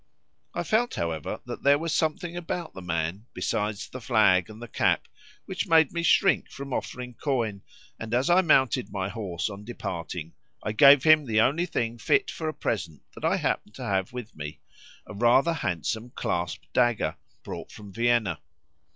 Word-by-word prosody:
I - - -1
felt, 235 +3 +1
however, 80 -3 -3
that - - -6
there 140 +1 +5
was 165 +1 -2
something 165 +2 -1
about 175 -1 -4
the 95 - -8
man, 85 +5 -3
besides 105 +3 -2
the 130 - -9
flag 105 -4 +3
and 110 0 -11
the 120 - -8
cap, - - +1 0.4
which - - -3
made 160 -3 +5
me 170 - -2
shrink 195 +3 +3
from 140 -1 -7
offering 125 0 -4
coin, 115 -7 -2 0.4
and 110 0 -6
as 125 +3 +2
I 175 +2 +5
mounted 130 - +3
my 95 -1 -2
horse 100 -6 -3
on 100 -1 -8
departing 85 -7 -6 0.3
I 105 - -1
gave 140 +5 +7
him 155 -2 +6
the 110 -1 +3
only 160 +9 +2
thing 115 -5 -2
fit 410 - +2
for 160 -1 -3
a - - -4
present 85 - -3
that - - -12
I - - +2
happened - - -2
to - - -7
have 95 -1 -1
with 125 -3 -8
me, 75 0 -7 0.5
a - - -9
rather 120 +9 +4
handsome 110 - -2
clasp 85 -2 -2
dagger, 120 -3 +2 0.3
brought - - -7
from 100 -2 -11
Vienna. 115 -7 +1
115 Hz, 175 wpm, -27 LUFS, 95-145 Hz, 0.5 s, gave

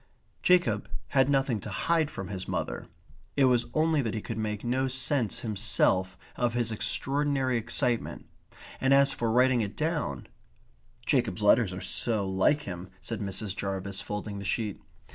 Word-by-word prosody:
Jacob 180 -1 +3 0.2
had 135 -1 +3
nothing 135 -5 +2
to 105 - -7
hide 155 - +1
from 95 0 -6
his 95 -2 -5
mother. - - -3 0.5
It 140 - +6
was 125 -2 +3
only 155 -1 +3
that 115 -3 -2
he 110 - -2
could 115 -1 -4
make 105 -1 -3
no 130 +2 +1
sense 130 -3 0
himself 95 -3 +1 0.2
of 120 -1 0
his 120 -2 0
extraordinary 135 +4 0
excitement, 115 +1 -1 0.5
and 135 +1 +4
as 140 0 +5
for 115 - -1
writing 125 +1 +4
it 100 -2 -4
down 160 0 -1 0.8
"Jacob's - - +1
letters - - +5
are - - -6
so 95 - 0
like 95 +11 +2
him," 90 -1 -6
said 115 +4 -5
Mrs. 100 -1 -3
Jarvis, 95 0 -3
folding 105 -1 -5
the - - -6
sheet. 105 0 -2
115 Hz, 160 wpm, -28 LUFS, 100-135 Hz, 0.8 s, It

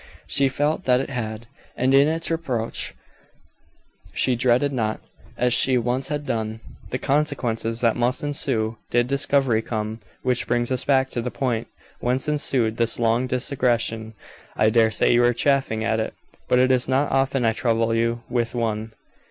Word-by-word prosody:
She 140 -1 +2
felt 150 +6 -1
that 125 -1 +4
it 135 - -4
had, 110 -2 -4 0.3
and 130 +2 +2
in 140 +1 +6
its 165 +1 -1
approach 130 -9 -2 1.2
she 130 - +2
dreaded 125 +3 +2
not, 110 -4 -1 0.4
as 125 -1 +2
she 130 0 +5
once 125 +3 0
had 150 -1 -3
done, 110 -2 -3 0.3
the 125 - -2
consequences 120 -6 -1
that 115 -2 +2
must 120 +3 0
ensue, 115 -6 -1
did 120 0 +2
discovery 135 -3 +2
come. 110 -1 -4 0.2
Which 125 -1 +1
brings 120 +1 0
us 130 - 0
back 135 -1 +2
to 120 - -2
the 125 - -3
point 120 -4 -2 0.3
whence 125 +4 0
ensued 130 -7 +1
this 115 -1 0
long 115 +2 +1
digression. 120 -4 -1 0.4
I 110 0 +3
dare 115 -1 +4
say 110 - +2
you 120 0 +4
are 120 0 +3
chafing 135 -4 +1
at 110 0 0
it, 110 - -3 0.3
but - - +3
it 130 +1 +4
is 125 -1 +2
not 135 +3 +1
often 135 -1 +1
I 115 - +3
trouble 115 -1 0
you 115 +1 0
with 120 -1 -2
one. 110 -1 -2
120 Hz, 170 wpm, -23 LUFS, 115-135 Hz, 1.2 s, in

